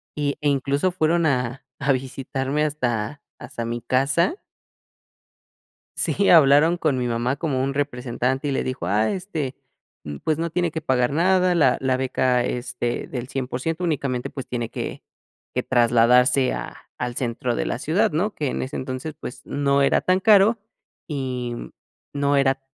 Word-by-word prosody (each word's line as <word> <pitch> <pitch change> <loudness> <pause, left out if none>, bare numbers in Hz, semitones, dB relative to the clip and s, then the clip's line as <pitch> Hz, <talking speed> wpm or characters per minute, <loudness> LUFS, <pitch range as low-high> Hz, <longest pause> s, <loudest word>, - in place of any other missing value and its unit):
y 145 -1 0
e 145 - +2
incluso 140 +6 +1
fueron 170 -1 +1
a 125 -1 -1 0.2
a 140 0 +2
visitarme 135 +2 -2
hasta 125 -3 -2 0.2
hasta 120 -3 -6
mi 120 0 -3
casa. 135 - +1 1.6
Sí, 200 - +1
hablaron 155 +2 +6
con 150 -6 0
mi 125 - -1
mamá 120 +3 -1
como 140 -5 -1
un 135 +1 -1
representante 130 0 -2
y - - 0
le - - -1
dijo: 130 -9 -4
"Ah, 105 +3 +2
este, 165 -8 -4 0.5
mm, 75 -1 -6
pues 155 -1 +1
no 165 0 -2
tiene 175 0 0
que 160 - -3
pagar 130 -3 +1
nada, 180 +2 +3
la 135 -7 +4
la 130 -1 +1
beca 130 -1 +1
es 125 0 -4
de 120 0 -1
del 125 -1 -5
100%, 135 +7 -3
únicamente, 140 -6 -1
pues 135 -3 -7
tiene 120 -2 -3
que - - -5 0.5
que - - 0
trasladarse 125 +2 +4
a - - -7
al 125 -1 -3
centro 120 0 -2
de - - -1
la - - -2
ciudad", 160 +8 +1
¿no?, 190 +8 -1
que 145 -3 -2
en - - -3
ese 130 - -5
entonces, 130 +4 -5
pues, 125 - -8
no 140 0 +1
era 140 - +3
tan 185 +1 +2
caro 215 +2 +5 0.5
y 125 -5 -3 0.6
no 140 0 +1
era 135 -1 +2
135 Hz, 165 wpm, -23 LUFS, 125-155 Hz, 1.6 s, hablaron